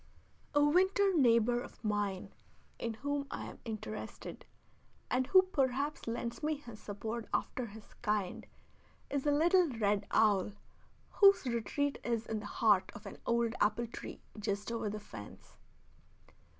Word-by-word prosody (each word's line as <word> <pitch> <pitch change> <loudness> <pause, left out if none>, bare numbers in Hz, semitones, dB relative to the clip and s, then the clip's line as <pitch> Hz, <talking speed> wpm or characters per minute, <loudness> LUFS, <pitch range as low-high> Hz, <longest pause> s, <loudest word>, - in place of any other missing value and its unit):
A 290 0 +6
winter 380 +5 +4
neighbor 240 -3 +4
of - - -11
mine 205 -3 -1 0.5
in 230 -1 -3
whom 285 +3 -2
I - - -5
am - - -9
interested, 215 -1 -6 0.6
and 255 0 +2
who 375 +3 +7
perhaps 280 -5 -1
lends 235 0 -3
me 305 +1 +1
his 235 -7 -11
support 220 +3 -5
after 250 -2 -1
his 215 0 -13
kind, 210 -5 -1 0.6
is 280 0 -1
a - - +5
little 345 +4 +4
red 205 -4 0
owl, 205 -2 +3 0.6
whose 395 -6 +6
retreat 255 +4 -1
is 235 -2 -1
in 220 -1 -2
the 205 - -7
heart 205 -3 +3
of 205 +1 -10
an 200 - -8
old 235 -1 +2
apple 210 +3 +2
tree 230 - -8 0.2
just 205 +1 -2
over 230 -2 -1
the 210 +1 -4
fence. 105 - -11
235 Hz, 145 wpm, -33 LUFS, 210-285 Hz, 0.6 s, who